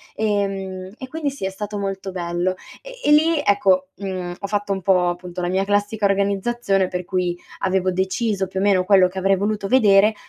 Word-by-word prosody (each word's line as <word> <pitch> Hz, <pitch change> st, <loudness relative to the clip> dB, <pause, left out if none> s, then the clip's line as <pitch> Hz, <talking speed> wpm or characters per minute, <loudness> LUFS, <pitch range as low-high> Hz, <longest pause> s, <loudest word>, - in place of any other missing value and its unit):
ehm, 195 Hz, -3 st, -2 dB
e 260 Hz, -, -8 dB
quindi 315 Hz, -2 st, -2 dB
sì 270 Hz, -8 st, -6 dB
è 190 Hz, -, 0 dB
stato 205 Hz, +2 st, -5 dB
molto 195 Hz, -1 st, -4 dB
bello. 175 Hz, +1 st, -2 dB, 0.3 s
E -, -, -11 dB
e -, -, +5 dB
lì, 315 Hz, +1 st, +4 dB
ecco, 190 Hz, -2 st, +3 dB
mhmm, 185 Hz, -3 st, -4 dB
ho 200 Hz, -, -4 dB
fatto 205 Hz, -1 st, -1 dB
un 190 Hz, -, -4 dB
po', 180 Hz, -1 st, +3 dB
appunto, 175 Hz, 0 st, -6 dB
la 175 Hz, -, -1 dB
mia 190 Hz, +1 st, +1 dB
classica 205 Hz, +1 st, 0 dB
organizzazione 200 Hz, 0 st, 0 dB
per 180 Hz, -1 st, -4 dB
cui 180 Hz, -1 st, -1 dB, 0.2 s
avevo 190 Hz, -1 st, +1 dB
deciso 190 Hz, +2 st, -1 dB
più 190 Hz, -, -4 dB
o -, -, 0 dB
meno 195 Hz, -2 st, +3 dB
quello 190 Hz, -1 st, +5 dB
che 185 Hz, +1 st, -6 dB
avrei 195 Hz, +1 st, +3 dB
voluto 205 Hz, 0 st, -1 dB
vedere, 210 Hz, -3 st, +5 dB
195 Hz, 200 wpm, -21 LUFS, 185-205 Hz, 0.3 s, e